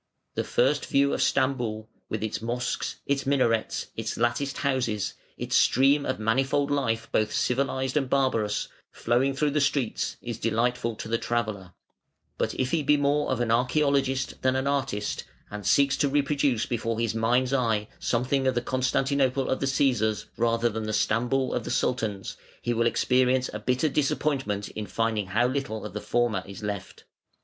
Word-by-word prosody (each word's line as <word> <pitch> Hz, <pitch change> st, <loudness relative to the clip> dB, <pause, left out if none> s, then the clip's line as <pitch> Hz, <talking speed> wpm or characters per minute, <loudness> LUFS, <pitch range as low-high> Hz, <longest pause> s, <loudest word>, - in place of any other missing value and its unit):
The -, -, -1 dB
first 140 Hz, +4 st, +1 dB
view 140 Hz, 0 st, +3 dB
of -, -, -1 dB
Stamboul, 120 Hz, -5 st, 0 dB, 0.2 s
with 110 Hz, 0 st, -3 dB
its 110 Hz, 0 st, -3 dB
mosques, 120 Hz, +2 st, -2 dB
its 140 Hz, -1 st, -1 dB
minarets, 125 Hz, -5 st, +1 dB
its 110 Hz, 0 st, -3 dB
latticed 120 Hz, +4 st, 0 dB
houses, 125 Hz, -7 st, -1 dB, 0.2 s
its -, -, -2 dB
stream 140 Hz, +3 st, +4 dB
of 130 Hz, -, -1 dB
manifold 135 Hz, +6 st, +1 dB
life 115 Hz, -5 st, 0 dB
both 110 Hz, 0 st, +1 dB
civilised 130 Hz, +1 st, 0 dB
and 135 Hz, -4 st, +1 dB
barbarous, 115 Hz, -6 st, +1 dB, 0.2 s
flowing 130 Hz, +4 st, +1 dB
through 145 Hz, +1 st, +1 dB
the 150 Hz, +1 st, +1 dB
streets, 140 Hz, -4 st, 0 dB
is 120 Hz, -2 st, -6 dB
delightful 115 Hz, +1 st, 0 dB
to 110 Hz, -, -7 dB
the 115 Hz, +1 st, 0 dB
traveller; 105 Hz, -6 st, -2 dB, 0.7 s
but -, -, -1 dB
if 130 Hz, 0 st, -1 dB
he 165 Hz, -, +2 dB
be 150 Hz, +1 st, +3 dB
more 145 Hz, +1 st, +1 dB
of 130 Hz, -2 st, 0 dB
an 115 Hz, -2 st, 0 dB
archaeologist 135 Hz, +2 st, +1 dB
than 130 Hz, 0 st, +2 dB
an 130 Hz, 0 st, 0 dB
artist, 135 Hz, -7 st, -1 dB, 0.3 s
and 105 Hz, -2 st, -5 dB
seeks 140 Hz, -1 st, +4 dB
to 145 Hz, -, +2 dB
reproduce 140 Hz, -4 st, +1 dB
before 115 Hz, -2 st, -2 dB
his 115 Hz, -2 st, 0 dB
mind's 120 Hz, +4 st, +1 dB
eye 115 Hz, -5 st, +1 dB
something 130 Hz, +3 st, 0 dB
of 130 Hz, -, +2 dB
the 120 Hz, -, +1 dB
Constantinople 130 Hz, +1 st, +1 dB
of 130 Hz, -, 0 dB
the 135 Hz, -, -1 dB
Cæsars 125 Hz, -6 st, +1 dB
rather 115 Hz, 0 st, +2 dB
than 110 Hz, -1 st, -3 dB
the 110 Hz, -, -2 dB
Stamboul 125 Hz, +5 st, +1 dB
of -, -, -1 dB
the -, -, -6 dB
Sultans, 110 Hz, -6 st, -1 dB, 0.3 s
he 120 Hz, -, 0 dB
will 115 Hz, 0 st, +2 dB
experience 125 Hz, +1 st, +2 dB
a 105 Hz, -, -4 dB
bitter 125 Hz, +7 st, +1 dB
disappointment 135 Hz, -7 st, 0 dB
in 105 Hz, -1 st, -6 dB
finding 115 Hz, -3 st, -1 dB
how 110 Hz, +6 st, +2 dB
little 125 Hz, -5 st, -3 dB
of -, -, -7 dB
the 105 Hz, -, -4 dB
former 120 Hz, -5 st, 0 dB
is 100 Hz, +2 st, -9 dB
left. 100 Hz, -3 st, -5 dB
125 Hz, 175 wpm, -26 LUFS, 110-135 Hz, 0.7 s, stream